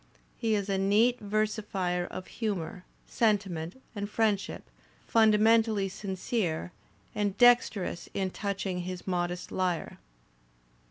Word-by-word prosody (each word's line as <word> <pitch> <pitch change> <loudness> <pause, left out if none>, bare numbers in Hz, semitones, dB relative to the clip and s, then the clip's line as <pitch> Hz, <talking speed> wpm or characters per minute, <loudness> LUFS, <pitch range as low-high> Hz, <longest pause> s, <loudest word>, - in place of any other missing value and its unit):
He 225 -2 0
is 200 -1 -1
a 195 -1 0
neat 215 +6 +3
ver 215 +1 +1
sifier 190 -5 -2
of 185 - -7
humour, 195 -5 -4 0.2
sentiment, 195 -4 0
and 205 -2 -4
friendship, 210 -2 0 0.4
fundamentally 220 -2 +4
sincere 190 -3 -2 0.4
and 205 -1 -1
dexterous 240 -8 +3
in 190 -1 -1
touching 195 -2 -3
his 180 0 -5
modest 175 -1 -2
lyre. 180 -4 -2
200 Hz, 110 wpm, -29 LUFS, 180-215 Hz, 0.4 s, fundamentally